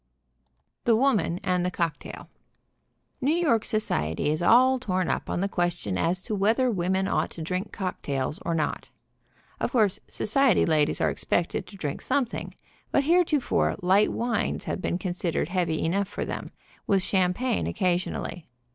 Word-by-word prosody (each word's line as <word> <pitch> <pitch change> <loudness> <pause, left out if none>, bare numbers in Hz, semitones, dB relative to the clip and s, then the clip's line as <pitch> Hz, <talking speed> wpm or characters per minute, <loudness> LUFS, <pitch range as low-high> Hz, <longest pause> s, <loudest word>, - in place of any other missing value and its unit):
THE 230 - +5
WOMAN 215 -9 +2
AND 180 -2 +1
THE 180 - +1
COCKTAIL. 170 -4 -4 0.9
New 285 +5 +2
York 285 -11 +2
society 80 - -1
is 155 - -1
all 255 +7 +5
torn 185 -7 -1
up - - -2
on 175 - -1
the 195 - +1
question 175 - -1
as 175 - 0
to - - -4
whether 225 +6 +2
women 190 0 0
ought - - 0
to 165 - -7
drink 185 +5 -3
cocktails 150 -7 -3
or 170 - -2
not. 155 -2 -2 0.7
Of - - -1
course, 210 -4 +3
society 265 +1 +2
ladies 155 -2 +2
are - - +2
expected 175 - -1
to 200 - -12
drink 145 -6 -4
some 275 0 +1
thing, 235 - -7 0.3
but 280 - +2
heretofore 320 -3 +2
light 195 +4 +4
wines 235 -1 -1
have - - -3
been 175 - -1
considered 175 -3 -2
heavy 175 -4 0
enough 195 +4 0
for 205 - -4
them, - - -5 0.4
with 195 -2 +3
champagne 195 +7 +1
occasionally. 180 -2 -2
185 Hz, 155 wpm, -26 LUFS, 175-230 Hz, 0.9 s, THE